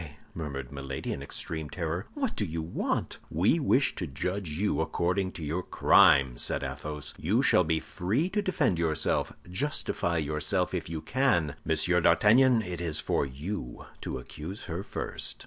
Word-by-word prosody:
murmured 70 -5 -5
Milady, 70 -1 -4
in - - -6
extreme 80 +2 -4
terror; 85 +3 -3
"what 275 -5 -1
do - - -1
you 80 -3 -3
want?" 80 - -2
"We 95 - +2
wish 135 -2 +3
to 90 - -2
judge 90 +6 -3
you 95 +8 0
according 95 +2 0
to 85 - -6
your 80 +5 -1
crime," 65 -7 +5
said - - 0
Athos; 75 -1 -4
"you 110 - +2
shall 90 - +5
be 80 -1 +1
free 100 - -1
to 210 +2 0
defend 155 - +1
yourself. 80 -3 +1 0.2
Justify 90 - -1
yourself 80 +5 0
if 85 -3 -3
you 80 -2 -4
can. 125 - +1
M. 85 +3 +2
d'Artagnan, 115 +8 +5
it 90 -3 -5
is 80 -3 0
for 70 - 0
you 70 +1 -6 0.2
to - - -4
accuse 90 +8 -8
her 85 -1 -4
first." - - -4
85 Hz, 165 wpm, -29 LUFS, 75-100 Hz, 0.2 s, crime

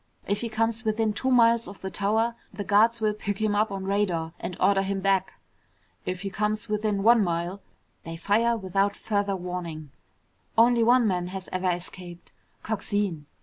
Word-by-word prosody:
If 200 +1 -1
he 235 - -3
comes 225 +1 0
within 220 -1 0
two 260 +5 -2
miles 235 -2 +4
of 200 - -11
the 190 - -5
tower, 220 +5 +1 0.2
the 205 - -5
guards 225 +4 +4
will 215 -1 +2
pick 205 -1 -4
him 215 -1 +1
up 210 +1 +1
on 195 -1 -4
radar 190 -5 -1
and 180 - -5
order 195 +1 +4
him 195 0 -2
back. 190 -1 +1 0.7
If 180 -1 -3
he 195 0 -4
comes 210 +1 -1
within 210 -1 -1
one 230 0 +6
mile, 175 +2 -2 0.4
they 165 0 -7
fire 225 +7 +2
without 195 0 0
further 200 -2 -1
warning. 175 -5 -6 0.7
Only 235 +1 +5
one 240 +1 +5
man 180 -4 0
has 190 0 -7
ever 185 0 0
escaped. 175 0 -6 0.3
Coxine. 205 -7 -2
200 Hz, 175 wpm, -26 LUFS, 185-220 Hz, 0.7 s, one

